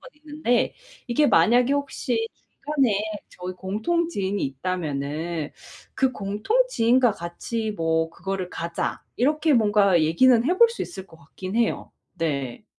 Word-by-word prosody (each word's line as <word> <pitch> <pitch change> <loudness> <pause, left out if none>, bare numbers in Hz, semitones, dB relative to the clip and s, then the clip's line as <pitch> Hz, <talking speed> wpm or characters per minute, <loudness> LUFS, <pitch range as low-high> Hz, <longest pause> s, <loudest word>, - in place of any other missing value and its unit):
건 260 - -13
있는데 300 -5 -1 0.3
이게 290 +5 +3
만약에 245 +1 +4
혹시 255 -5 -1 0.2
중간에 270 -9 0 0.3
저희 180 +1 -7
공통 220 - -1
지인이 200 - -2
있다면은 155 +1 -3 0.4
"그 265 -1 +1
공통 210 - 0
지인과 245 - +3
같이 215 +5 -4
뭐 160 -3 0
그거를 185 +1 -4
가자." 170 0 -3
이렇게 305 +5 +2
뭔가 205 -6 +4
얘기는 230 +10 +4
해 365 - +2
볼 470 +1 +7
수 465 - -8
있을 190 - -7
것 165 - -16
같긴 185 +6 -7
해요. 235 -1 0 0.2
네. 140 -7 -3
210 Hz, 270 characters per minute, -24 LUFS, 170-260 Hz, 0.4 s, 볼